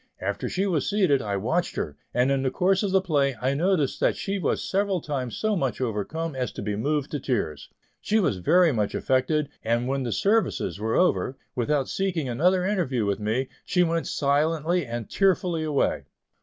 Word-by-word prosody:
After - - -3
she 190 +2 0
was 170 -7 0
seated, 185 -10 +3
I 100 -2 -2
watched 160 - -1
her, 75 - -3 0.2
and 125 +2 +2
in 135 -1 +1
the 135 - +1
course 190 +5 +2
of 205 - 0
the 190 0 +3
play 140 -6 +1
I 130 +2 0
noticed 160 -2 +1
that - - +2
she 200 0 -2
was - - -1
several 195 -1 +1
times 135 -6 -4
so 215 -1 0
much 135 -8 -1
overcome 130 +7 -3
as 125 -1 -2
to - - -6
be 105 0 -2
moved 145 +6 -1
to 150 - -2
tears. 100 - -2 0.3
She 220 - +1
was 175 - +1
very 170 - +4
much 105 -5 -1
affected, 145 +3 +1
and 115 +2 0
when 135 +1 -1
the 120 -3 -2
"services" 195 - +1
were 110 +1 -1
over, 155 -7 +2 0.2
without 135 +2 0
seeking 180 -7 -1
another 180 +9 +2
interview 165 - 0
with 100 0 -1
me, 110 +5 -1
she 180 - +2
went 165 -1 0
silently 155 +3 +1
and 115 -1 -4
tearfully 185 -4 +1
away. 150 -3 0
145 Hz, 195 wpm, -25 LUFS, 125-180 Hz, 0.3 s, very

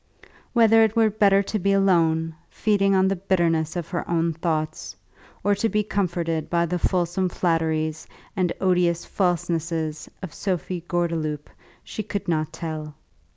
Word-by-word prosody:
Whether 225 -1 +6
it 220 0 +1
were 225 -2 +4
better 200 -1 +4
to 215 +2 -2
be 195 +2 +2
alone, 165 -4 +2 0.2
feeding 195 -2 +2
on 190 0 +4
the 195 - +1
bitterness 170 -4 0
of 170 -2 -4
her 175 - -4
own 165 -1 +1
thoughts, 155 -2 -3 0.5
or 205 +1 +3
to 215 +3 0
be 210 -1 +1
comforted 170 -6 -1
by 170 0 +2
the 175 +1 -2
fulsome 180 +1 0
flatteries 160 -3 -1 0.3
and 185 -3 +1
odious 175 -2 +2
falsenesses 165 -3 -1
of 180 - -6
Sophie 185 -2 -3
Gordeloup, 160 -4 -2 0.3
she - - -5
could 205 -1 -4
not 155 -2 0
tell. 155 -2 -6
175 Hz, 150 wpm, -24 LUFS, 160-195 Hz, 0.5 s, Whether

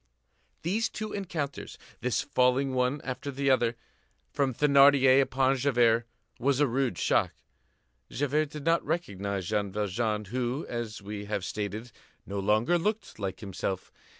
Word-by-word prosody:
These 210 +7 0
two 215 0 -5
encounters, 165 -8 -4 0.2
this 125 0 0
falling 130 +1 +2
one 130 +3 0
after 130 +2 -4
the 140 0 +1
other, 120 -2 +2 0.6
from 140 -2 +1
Thénardier 140 0 +6
upon 135 0 +2
Javert, 120 -3 +3 0.3
was 135 +2 +1
a 145 - +5
rude 130 -6 0
shock. - - +2 0.8
Javert 145 +2 0
did 150 -1 -8
not 165 0 +3
recognize 100 - -2
Jean 105 -2 0
Valjean, 105 +2 -1
who, 125 +6 -2
as 115 -4 -5
we 105 0 -6
have 100 -2 -3
stated, 105 +4 -4 0.3
no 100 0 -4
longer 110 - +2
looked 210 - -2
like 95 0 -4
himself. 95 -2 -4
125 Hz, 140 wpm, -29 LUFS, 105-140 Hz, 0.8 s, Thénardier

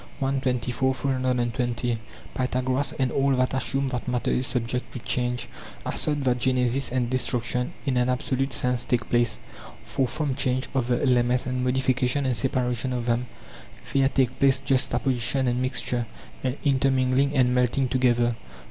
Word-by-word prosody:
] - - -21
i. 135 - +1
24; 130 -1 0
820. 125 -3 -1 0.3
Pythagoras 130 +2 0
and 130 -2 +1
all 135 +1 +2
that 130 0 +1
assume 135 +1 0
that 125 -1 -4
matter 125 -1 0
is 125 - 0
subject 125 0 -2
to - - -6
change 125 0 -1 0.4
assert 145 -2 0
that 125 -1 +1
genesis 130 +1 +1
and 125 -1 0
destruction 125 -1 0
in 135 -3 +1
an 125 0 +2
absolute 130 +1 -1
sense 125 -1 +1
take 120 -3 -1
place; 120 -2 +2 0.5
for 130 - 0
from 150 0 -1
change 130 -1 0
of 130 -3 0
the 120 -1 +1
elements 125 -1 +2
and 125 0 -2
modification 130 +1 +1
and 130 -2 +1
separation 125 +1 -1
of 120 -1 -2
them 120 +1 0 0.7
there 135 -1 +4
take 130 -2 0
place 135 -1 +5
juxtaposition 130 0 0
and 125 +1 0
mixture, 125 -2 -1 0.4
and 130 +1 -1
intermingling 135 0 +2
and 125 -1 +4
melting 125 +1 +2
together. 120 -2 +2
125 Hz, 155 wpm, -25 LUFS, 125-130 Hz, 0.7 s, place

